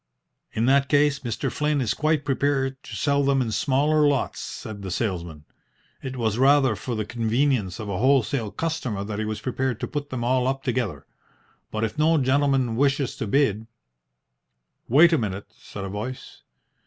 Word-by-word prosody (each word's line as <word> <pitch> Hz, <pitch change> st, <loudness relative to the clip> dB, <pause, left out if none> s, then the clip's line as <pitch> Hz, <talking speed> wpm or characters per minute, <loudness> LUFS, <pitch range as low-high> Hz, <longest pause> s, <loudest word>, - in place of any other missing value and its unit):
"In 115 Hz, -, 0 dB
that 140 Hz, +2 st, +3 dB
case 145 Hz, -1 st, +3 dB
Mr. 120 Hz, -5 st, -3 dB
Flynn 150 Hz, 0 st, 0 dB
is 120 Hz, -5 st, 0 dB
quite 155 Hz, -1 st, 0 dB
prepared 135 Hz, -1 st, 0 dB
to -, -, -8 dB
sell 140 Hz, -1 st, +1 dB
them 135 Hz, 0 st, +2 dB
in 120 Hz, -3 st, -1 dB
smaller 145 Hz, +7 st, +2 dB
lots," 140 Hz, -1 st, 0 dB
said 105 Hz, -2 st, -7 dB
the 95 Hz, -, -5 dB
salesman. 85 Hz, -, -3 dB, 0.6 s
"It 130 Hz, -1 st, -6 dB
was 110 Hz, -1 st, -1 dB
rather 135 Hz, -3 st, +4 dB
for 120 Hz, +4 st, -4 dB
the 110 Hz, -1 st, -2 dB
convenience 115 Hz, -3 st, 0 dB
of 110 Hz, -, -5 dB
a 100 Hz, -2 st, -3 dB
wholesale 130 Hz, -2 st, +2 dB
customer 130 Hz, -9 st, -3 dB
that 105 Hz, 0 st, -5 dB
he 110 Hz, -, -1 dB
was 110 Hz, 0 st, -4 dB
prepared 130 Hz, -2 st, -2 dB
to -, -, -3 dB
put 145 Hz, -1 st, -4 dB
them 125 Hz, -2 st, -4 dB
all 125 Hz, +1 st, +2 dB
up 135 Hz, 0 st, -2 dB
together. 115 Hz, -, -2 dB, 0.6 s
But 110 Hz, 0 st, -3 dB
if 115 Hz, +7 st, -3 dB
no 160 Hz, +1 st, +4 dB
gentleman 135 Hz, -3 st, +2 dB
wishes 140 Hz, +1 st, +1 dB
to 110 Hz, -, -3 dB
bid 110 Hz, -3 st, +1 dB, 0.6 s
" -, -, -53 dB
"Wait 160 Hz, +7 st, +6 dB
a 160 Hz, -, +3 dB
minute," 100 Hz, -2 st, -3 dB
said 100 Hz, -, -9 dB
a 95 Hz, -, -4 dB
voice. 110 Hz, +6 st, -7 dB
130 Hz, 180 wpm, -24 LUFS, 110-140 Hz, 0.6 s, Wait